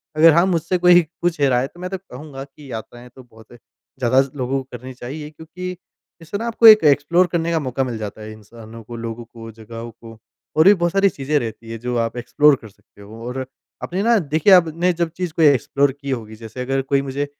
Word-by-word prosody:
अगर 160 +1 +7
हाँ, 170 +2 +4
मुझसे 175 0 0
कोई 180 0 +6 0.2
पूछे 160 -6 +1
राय 125 -1 +2
है 135 - -2
तो 175 - -19
मैं 180 +1 -5
तो 190 - -4
कहूँगा 140 -5 -10
कि 140 -1 -14
यात्राएँ 120 +2 -9
तो 130 - -13
बहुत 115 -1 -19 0.5
ज़्यादा 130 +2 +3
लोगों 135 +1 -2
करनी 130 +2 -9
चाहिए। 145 +5 -8
क्योंकि 175 +4 -8 0.4
इससे 165 +5 -5
न - - -7
आपको 230 0 +4
एक 215 -5 +9
एक्सप्लोर 150 +5 +3
करने 170 -1 -1
का 165 - +1
मौका 135 -1 -2
मिल 120 -3 -4
जाता 105 0 -7
है 110 0 -8
इंसानों 110 +1 -13
को, 120 +2 -9
लोगों 115 0 -6
को, 115 -1 -11
जगहों 115 +1 -9
को 115 0 -14 0.4
और 155 - +4
भी 200 - +8
बहुत 175 -2 0
सारी 195 +1 +3
चीज़ें 145 0 -2
रहती 115 -1 -7
है 115 - -5
जो 125 +2 -4
आप 115 +1 -2
एक्सप्लोर 145 +4 +3
कर 110 - -11
सकते 100 - -23
हो। 110 +3 -11
और 130 +1 -4 0.4
अपने 185 +3 -3
ना 230 0 +4
देखिए 155 +4 +3
आपने 175 0 +3
जब 170 -1 -1
चीज़ 180 -3 -3
को 165 - -2
एक्सप्लोर 140 -1 +3
की 140 - -6
होगी 110 -3 -5
जैसे 115 +3 -9
अगर 135 +1 -1
कोई 135 +1 0
मुझे 140 +1 -3
135 Hz, 225 wpm, -20 LUFS, 115-170 Hz, 0.5 s, एक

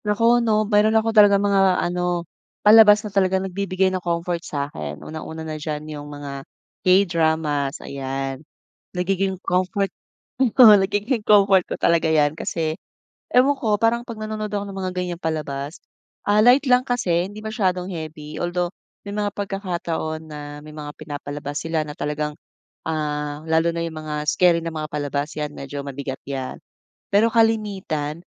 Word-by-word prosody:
Naku, 230 +3 +3
'no, 215 -2 +2
mayroon 210 +1 +3
ako 225 0 +1
talagang 205 -2 +6
mga 195 -2 +3
ano, 175 0 -1 0.4
palabas 210 0 +8
na 205 - -6
talagang 190 -1 +2
nagbibigay 190 0 0
ng 185 - -2
comfort 170 0 -2
sa'kin. 140 - -5
Una-una 160 0 -7
na 155 -1 -5
diyan 150 0 -4
yung 145 0 -8
mga 145 -1 -7 0.4
K-dramas, 160 -6 +2
ayan, 135 0 -4 0.6
nagiging 190 +1 0
comfort, 185 +2 0 0.5
oo, 240 -3 +8
nagiging 205 +5 0
comfort 195 -3 +5
ko - - -2
talaga 165 -1 +2
yan 150 -2 +3
kasi, 160 -2 -2 0.6
ewan 260 +3 +5
ko, 215 -5 +1
parang 230 +1 +3
'pag 230 -3 -7
nanonood 215 0 -4
ako 205 0 -2
ng 195 - -8
mga 185 -1 -2
ganyang 180 -1 -3
palabas, 150 -2 -3 0.5
ah, 205 +1 +4
light 250 +6 +5
lang 250 0 +6
kasi 185 -9 0
hindi 205 - -11
masyadong 190 -5 0
heavy. 155 -2 -7
Although, 175 0 -1 0.3
may 200 - -6
mga 205 -1 0
pagkakataon 175 -5 -3
na 150 -1 -7 0.3
may 155 - -11
mga 150 -1 -7
pinapalabas 145 0 -6
sila 160 -1 -1
na 150 - -7
talagang, 150 0 -2 0.6
ah, 150 -2 -2
lalo 160 +1 +3
na 170 - -2
yung 165 -1 -6
mga 150 -1 -4
scary 175 0 +4
na 165 - -3
mga 155 0 -3
palabas, 145 0 -2
yan, 150 -1 -3
medyo 140 +1 -6
mabigat 135 -1 -5
yan. 135 -2 -5 0.5
Pero 205 +3 +5
kalimitan, 195 -9 0
175 Hz, 155 wpm, -22 LUFS, 150-205 Hz, 0.6 s, palabas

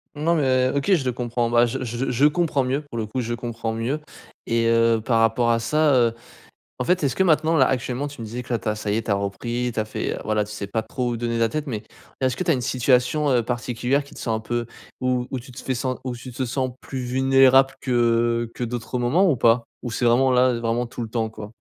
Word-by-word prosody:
Non 165 +3 +1
mais 130 -4 +2
OK, 140 +8 +2
je 155 -8 +2
le 125 - +1
comprends, 120 -1 -2
bah, 120 0 +4
je 120 - -3
je 120 +2 -2
je 130 +4 +3
comprends 150 -3 +1
mieux, 130 +3 -1
pour 130 -5 -6
le 110 - -3
coup, 110 +5 -4
je 120 0 -3
comprends 115 -2 -4
mieux 120 +7 -2 0.5
et 115 0 +1
heu, 115 -1 +3
par 115 -2 +2
rapport 115 +1 +2
à 115 0 +3
ça, 155 +5 +2
heu, 120 -2 +3 0.7
en - - -1
fait, 180 0 +1
est-ce 135 -3 0
que 190 - +3
maintenant, 160 -1 +3
là, - - +5
actuellement 130 +2 -1
tu 145 -4 -9
me 115 - -5
disais 125 +3 -6
que 125 - -6
là, 115 - 0
tu 100 - -4
as 110 - 0
ça 105 -1 -2
y - - +1
est, 115 - 0
tu - - -2
as - - +4
repris. 120 +5 -2
Tu 110 - 0
as 110 - -1
fait, 110 - -3
heu, - - -5
voilà, 110 -1 +1
tu 105 - -10
sais 100 -1 -5
pas 110 +2 -1
trop 125 +3 -3
où 120 - -2
donner 115 0 -2
de 115 - -1
la 115 - +3
tête 150 +6 -3
mais 110 -6 -4 0.4
est-ce 130 -2 +1
que 185 - -2
tu 170 - +3
as - - +2
une 130 - -2
situation, 125 +4 +2
heu, 120 -2 +3
particulière 125 +3 -1
qui 140 - -15
te - - -10
sens 115 -3 -1
un 110 - -4
peu 120 +1 -3 0.3
où 125 -1 0
où 130 - -2
tu 130 - -14
te 120 - -9
fais 130 - -2
sen 130 +1 -2
où 130 -2 -3
tu 125 +2 -9
te 130 +2 -2
sens 130 +1 -1
plus 135 - -5
vulnérable 135 +1 +4
que 120 -2 +1
que - - -7
d'autres 120 +1 -3
moments 160 +11 +3
ou 155 - +3
pas? 115 +1 +3 0.2
Ou 120 - -4
c'est 120 - -2
vraiment 125 +3 +4
là, 125 0 +4
vraiment 115 +1 0
tout 120 0 -7
le 115 - -4
temps, 110 -1 -2
quoi? 105 -1 -9
120 Hz, 275 wpm, -23 LUFS, 115-130 Hz, 0.7 s, là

